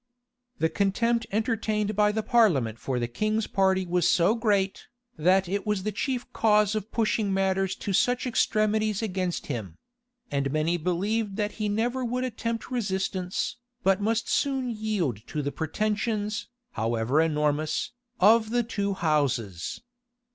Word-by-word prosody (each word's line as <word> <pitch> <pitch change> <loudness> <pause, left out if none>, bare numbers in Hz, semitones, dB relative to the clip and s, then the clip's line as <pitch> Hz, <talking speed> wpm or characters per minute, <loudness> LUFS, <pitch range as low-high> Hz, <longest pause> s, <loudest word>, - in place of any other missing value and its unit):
The 160 - +2
contempt 225 +6 +1
entertained 215 -1 0
by 210 0 +4
the 220 +1 -2
parliament 155 - +3
for 130 -2 -2
the 120 -1 -1
king's 215 - -1
party 190 -1 +2
was 175 -1 +2
so 180 +4 +4
great, 205 -4 0 0.3
that 185 +4 +3
it 200 +3 -2
was 210 -3 0
the 215 - -1
chief 245 +4 -2
cause 210 -2 +3
of 215 0 -4
pushing 215 -2 +1
matters 190 0 +1
to 200 - -4
such 250 +4 +2
extremities 215 -3 +1
against 185 -4 -2
him; 105 - -5 0.5
and 140 -1 0
many 155 +3 +1
believed 195 +5 -1
that 210 0 -1
he 210 - 0
never 240 +5 0
would 250 +1 -1
attempt 230 -1 -3
resistance, 190 -5 -2 0.3
but 195 +1 +3
must 225 +2 0
soon 265 -3 0
yield 210 - -1
to 150 -1 -3
the 145 - -2
pretensions, 210 +6 -2 0.2
however 115 - +1
enormous, 150 -1 0 0.3
of 220 +3 +5
the 240 +1 +1
two 200 -3 -2
houses. 135 - -1
205 Hz, 145 wpm, -27 LUFS, 170-220 Hz, 0.5 s, of